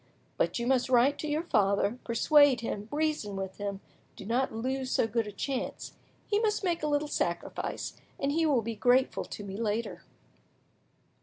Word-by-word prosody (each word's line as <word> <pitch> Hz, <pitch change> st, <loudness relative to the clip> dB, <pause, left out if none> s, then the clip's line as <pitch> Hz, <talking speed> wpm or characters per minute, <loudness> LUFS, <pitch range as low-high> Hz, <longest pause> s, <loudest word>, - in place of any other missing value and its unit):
But -, -, 0 dB
you 235 Hz, -, -2 dB
must 255 Hz, 0 st, +2 dB
write 260 Hz, +3 st, +4 dB
to 305 Hz, -, -3 dB
your 300 Hz, +2 st, 0 dB
father, 205 Hz, -, +1 dB
persuade 270 Hz, +2 st, +4 dB
him, 210 Hz, -2 st, -4 dB
reason 300 Hz, -9 st, -1 dB
with 190 Hz, -1 st, -5 dB
him; 200 Hz, -1 st, -4 dB, 0.3 s
do -, -, -10 dB
not 245 Hz, +5 st, 0 dB
lose 260 Hz, +3 st, -2 dB
so -, -, +2 dB
good 225 Hz, 0 st, -1 dB
a -, -, -5 dB
chance. 260 Hz, +6 st, -4 dB, 0.3 s
He 415 Hz, -, +1 dB
must 430 Hz, -2 st, 0 dB
make 345 Hz, -3 st, 0 dB
a 305 Hz, -, 0 dB
little 295 Hz, 0 st, +1 dB
sacrifice, -, -, -3 dB, 0.3 s
and 275 Hz, 0 st, 0 dB
he 325 Hz, +2 st, +2 dB
will 265 Hz, -6 st, +2 dB
be 230 Hz, +1 st, -4 dB
grateful 250 Hz, +4 st, +2 dB
to 205 Hz, -, -7 dB
me 195 Hz, -1 st, -6 dB
later." 225 Hz, +1 st, -2 dB
250 Hz, 175 wpm, -29 LUFS, 215-290 Hz, 0.3 s, write